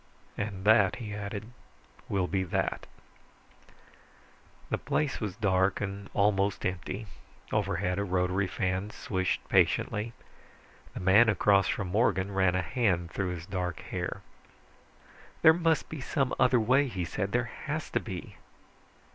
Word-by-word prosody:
"And 100 Hz, -2 st, -4 dB
that," 105 Hz, -3 st, +5 dB
he 110 Hz, -4 st, -6 dB
added, 105 Hz, +2 st, -5 dB, 0.6 s
"will 95 Hz, -2 st, +1 dB
be 95 Hz, +1 st, -1 dB
that." -, -, -2 dB, 1.8 s
The -, -, 0 dB
place 145 Hz, -3 st, -1 dB
was 100 Hz, -4 st, -3 dB
dark 95 Hz, -2 st, +2 dB
and 100 Hz, 0 st, -5 dB
almost 100 Hz, -1 st, +2 dB
empty. 95 Hz, +4 st, -3 dB, 0.5 s
Overhead, 90 Hz, +2 st, 0 dB
a -, -, +1 dB
rotary 95 Hz, 0 st, 0 dB
fan 95 Hz, +2 st, -2 dB
swished 95 Hz, -3 st, -2 dB
patiently. 110 Hz, +2 st, +2 dB, 0.8 s
The -, -, -5 dB
man 100 Hz, +6 st, +6 dB
across 100 Hz, -1 st, +4 dB
from 95 Hz, -3 st, -2 dB
Morgan 100 Hz, -1 st, +1 dB
ran 95 Hz, -2 st, +3 dB
a 95 Hz, -, +1 dB
hand 90 Hz, -5 st, 0 dB
through 95 Hz, -2 st, -2 dB
his 85 Hz, 0 st, -8 dB
dark 90 Hz, -3 st, -3 dB
hair. -, -, -4 dB, 1.2 s
"There 160 Hz, -, +9 dB
must 165 Hz, -1 st, +1 dB
be 155 Hz, -3 st, -7 dB
some 135 Hz, -1 st, 0 dB
other 125 Hz, -1 st, +5 dB
way," 130 Hz, +6 st, +3 dB
he 95 Hz, -8 st, -3 dB
said. 100 Hz, +3 st, -3 dB
"There 120 Hz, 0 st, 0 dB, 0.2 s
has 155 Hz, +2 st, -3 dB
to -, -, +1 dB
be." 95 Hz, -5 st, -7 dB
100 Hz, 140 wpm, -29 LUFS, 95-110 Hz, 1.8 s, There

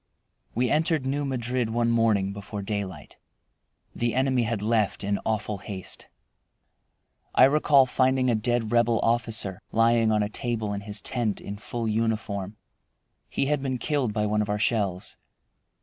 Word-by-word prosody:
We 125 Hz, +2 st, +1 dB
entered 155 Hz, -2 st, +1 dB
New 140 Hz, +2 st, -1 dB
Madrid 125 Hz, -2 st, -1 dB
one 115 Hz, +1 st, +1 dB
morning 110 Hz, -4 st, +2 dB
before 100 Hz, 0 st, -6 dB
daylight. 95 Hz, -6 st, -5 dB, 0.8 s
The 120 Hz, 0 st, -1 dB
enemy 130 Hz, -2 st, +2 dB
had 110 Hz, -2 st, -2 dB
left 110 Hz, -2 st, +1 dB
in 100 Hz, 0 st, 0 dB
awful 105 Hz, -2 st, -1 dB
haste. 95 Hz, -1 st, -7 dB, 1.3 s
I -, -, +7 dB
recall 140 Hz, 0 st, +5 dB
finding 130 Hz, 0 st, +2 dB
a 120 Hz, -, +3 dB
dead 115 Hz, 0 st, 0 dB
Rebel 120 Hz, -1 st, +3 dB
officer, 115 Hz, -5 st, 0 dB
lying 115 Hz, 0 st, +3 dB
on 105 Hz, -1 st, +2 dB
a -, -, -1 dB
table 110 Hz, -3 st, -2 dB
in 100 Hz, -, -4 dB
his 105 Hz, 0 st, -3 dB
tent, 120 Hz, -5 st, -1 dB
in 100 Hz, +1 st, -7 dB
full 115 Hz, +2 st, -4 dB
uniform. 110 Hz, -2 st, -2 dB, 0.7 s
He -, -, 0 dB
had 145 Hz, 0 st, 0 dB
been 130 Hz, -2 st, -2 dB
killed 135 Hz, -1 st, 0 dB
by 105 Hz, 0 st, 0 dB
one 105 Hz, 0 st, +1 dB
of 105 Hz, -, -3 dB
our 105 Hz, -, 0 dB
shells. 100 Hz, -4 st, -1 dB
115 Hz, 155 wpm, -26 LUFS, 105-125 Hz, 1.3 s, I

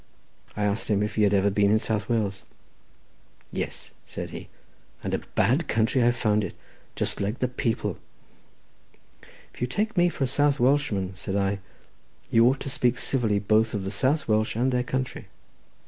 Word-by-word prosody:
I 105 Hz, -, 0 dB
asked 105 Hz, +1 st, 0 dB
him 105 Hz, -1 st, +2 dB
if 105 Hz, -, -2 dB
he 110 Hz, -, 0 dB
had 105 Hz, -1 st, +4 dB
ever 100 Hz, +1 st, +3 dB
been 100 Hz, 0 st, +3 dB
in 110 Hz, -, +5 dB
South 110 Hz, -1 st, -2 dB
Wales. 105 Hz, -4 st, 0 dB, 1.1 s
"Yes," -, -, -4 dB, 0.2 s
said -, -, -6 dB
he; -, -, -8 dB, 0.6 s
"and -, -, -3 dB
a -, -, +1 dB, 0.2 s
bad 135 Hz, +9 st, +2 dB
country 115 Hz, +3 st, +2 dB
I 120 Hz, -, +5 dB
found 105 Hz, -3 st, +1 dB
it; 95 Hz, -, -5 dB, 0.4 s
just -, -, -2 dB
like 105 Hz, +4 st, -1 dB
the 125 Hz, -, 0 dB
people." 120 Hz, -2 st, -2 dB, 1.5 s
"If -, -, -15 dB
you 125 Hz, -, +1 dB
take 210 Hz, -, -1 dB
me 175 Hz, -1 st, +4 dB
for 145 Hz, -, -3 dB
a -, -, +2 dB
South 145 Hz, +2 st, +2 dB
Welshman," 120 Hz, -8 st, +1 dB
said 95 Hz, +1 st, -4 dB
I, 100 Hz, 0 st, 0 dB, 0.7 s
"you 115 Hz, +1 st, +6 dB
ought 135 Hz, +2 st, +1 dB
to 140 Hz, -, -3 dB
speak 125 Hz, -1 st, +1 dB
civilly 115 Hz, -6 st, +1 dB
both 110 Hz, +2 st, +2 dB
of 100 Hz, -, -2 dB
the 95 Hz, -, -3 dB
South 135 Hz, +9 st, +1 dB
Welsh 110 Hz, -1 st, +1 dB
and 125 Hz, +3 st, +1 dB
their 125 Hz, -1 st, +1 dB
country." 130 Hz, +1 st, -3 dB
115 Hz, 180 wpm, -26 LUFS, 105-130 Hz, 1.5 s, you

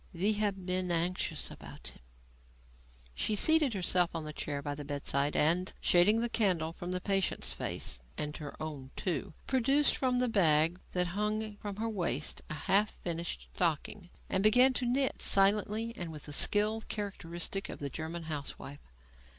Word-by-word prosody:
We 200 Hz, +5 st, +2 dB
have 205 Hz, -3 st, -1 dB
been 185 Hz, 0 st, 0 dB
anxious 175 Hz, +2 st, -1 dB
about -, -, -9 dB
him." -, -, -15 dB, 1.1 s
She 215 Hz, -, 0 dB
seated 300 Hz, 0 st, +4 dB
herself 180 Hz, -1 st, +2 dB
on 165 Hz, -, -3 dB
the 150 Hz, 0 st, -6 dB
chair 145 Hz, -1 st, -3 dB
by 145 Hz, 0 st, -3 dB
the 145 Hz, +1 st, -7 dB
bedside, 140 Hz, 0 st, -1 dB
and, 170 Hz, +5 st, +3 dB
shading 205 Hz, +6 st, +4 dB
the 240 Hz, -, +1 dB
candle 180 Hz, -9 st, +1 dB
from 175 Hz, +1 st, -7 dB
the 180 Hz, -, -1 dB
patient's 195 Hz, 0 st, 0 dB
face 65 Hz, -, -4 dB, 0.2 s
and 150 Hz, 0 st, -2 dB
her 150 Hz, -2 st, -8 dB
own, 145 Hz, -4 st, -6 dB
too 160 Hz, -4 st, -3 dB
produced 270 Hz, +3 st, +3 dB
from 250 Hz, -2 st, +1 dB
a 250 Hz, -, +2 dB
bag 165 Hz, -5 st, +3 dB
that 180 Hz, 0 st, +2 dB
hung 210 Hz, +1 st, -1 dB
from 205 Hz, -1 st, -6 dB
her 220 Hz, +3 st, -2 dB
waist 170 Hz, -, -2 dB
a 155 Hz, -, -4 dB
half 200 Hz, +7 st, +3 dB
finished 170 Hz, -1 st, -3 dB
stocking 175 Hz, +3 st, -1 dB, 0.2 s
and 190 Hz, -, 0 dB
began 250 Hz, +5 st, +6 dB
to 250 Hz, -1 st, -1 dB
knit 265 Hz, +2 st, +1 dB
silently 210 Hz, +3 st, +3 dB
and 175 Hz, -5 st, -5 dB
with 150 Hz, -2 st, -8 dB
the 145 Hz, -, -6 dB
skill 210 Hz, +7 st, +3 dB
characteristic 195 Hz, -2 st, -4 dB
of -, -, -6 dB
the 140 Hz, -1 st, -5 dB
German 165 Hz, +3 st, -5 dB
housewife. 145 Hz, -2 st, -6 dB
185 Hz, 165 wpm, -32 LUFS, 160-215 Hz, 1.1 s, began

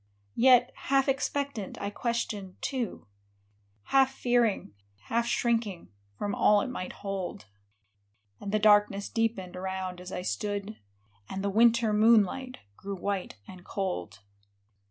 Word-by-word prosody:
Yet, 250 Hz, 0 st, +6 dB
half 270 Hz, 0 st, +1 dB
expectant, 275 Hz, -5 st, -2 dB
I 200 Hz, -, -3 dB
questioned, 210 Hz, -5 st, -3 dB
too, 250 Hz, -, -3 dB, 0.9 s
Half 265 Hz, -1 st, +5 dB
fearing, 240 Hz, -, +1 dB, 0.4 s
half 235 Hz, +1 st, +1 dB
shrinking, 225 Hz, -7 st, 0 dB, 0.3 s
from 205 Hz, -1 st, -2 dB
all 210 Hz, 0 st, +4 dB
it 255 Hz, -, -3 dB
might 185 Hz, -7 st, -5 dB
hold; 190 Hz, -, -4 dB, 0.9 s
And 200 Hz, -, -5 dB
the 215 Hz, -, +3 dB
darkness 205 Hz, -1 st, +4 dB
deepened 225 Hz, -6 st, -1 dB
around 185 Hz, -1 st, -4 dB
as 180 Hz, +1 st, -9 dB
I 180 Hz, -, -4 dB
stood; 205 Hz, +2 st, -3 dB, 0.5 s
And 195 Hz, 0 st, -4 dB
the 200 Hz, -, 0 dB
winter 230 Hz, +1 st, +4 dB
moonlight 230 Hz, +4 st, +3 dB, 0.2 s
grew 200 Hz, 0 st, -5 dB
white 195 Hz, -, -3 dB
and 180 Hz, -1 st, -11 dB
cold. 105 Hz, -, -4 dB
210 Hz, 125 wpm, -29 LUFS, 190-235 Hz, 0.9 s, Yet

